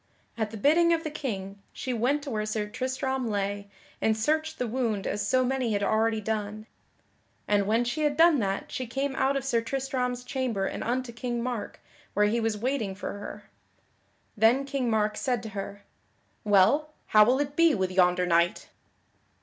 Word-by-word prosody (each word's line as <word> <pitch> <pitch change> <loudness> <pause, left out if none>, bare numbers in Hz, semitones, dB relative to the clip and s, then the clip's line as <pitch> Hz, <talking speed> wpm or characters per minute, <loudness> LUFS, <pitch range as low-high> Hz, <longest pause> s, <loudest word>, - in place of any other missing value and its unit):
At 220 -2 -2
the 220 - -7
bidding 325 +9 +4
of 330 -1 0
the 310 - -4
King, 200 -9 -5
she 255 - -3
went 260 +6 +1
to 280 - -5
where 215 -2 -1
Sir 215 -1 -2
Tristram 260 +2 -2
lay, 200 0 -2 0.3
and 220 0 +2
searched 315 +6 0
the 250 - -1
wound 225 -4 -1
as 205 - -2
so 255 0 +3
many 255 -3 0
had 205 0 0
already 220 +2 +2
done. 215 0 -3 0.8
And 205 -1 +2
when 225 +3 +2
she 240 +6 -2
had 295 -1 +1
done 330 -3 +6
that 195 -2 -2
she 255 - -4
came 270 +3 -2
out 270 +1 +2
of 270 - -4
Sir 235 -4 +1
Tristram's 250 0 -2
chamber 250 -6 -2
and - - -4
unto 250 0 -2
King 240 0 -3
Mark, 245 -4 -4 0.4
where 210 +1 +4
he 220 +3 +1
was 225 -2 0
waiting 225 -4 -2
for 200 - -5
her. - - -8 0.9
Then 235 +5 +4
King 275 -3 -1
Mark 215 -1 +1
said 245 -4 -1
to 220 - -6
her: 200 0 -7 0.6
"Well, 215 +10 +3
how 215 0 +7
will 250 +5 +3
it 285 0 -2
be 335 -2 +5
with 190 -2 -1
yonder 180 -1 +3
knight?" 170 0 +1
235 Hz, 185 wpm, -27 LUFS, 210-265 Hz, 0.9 s, how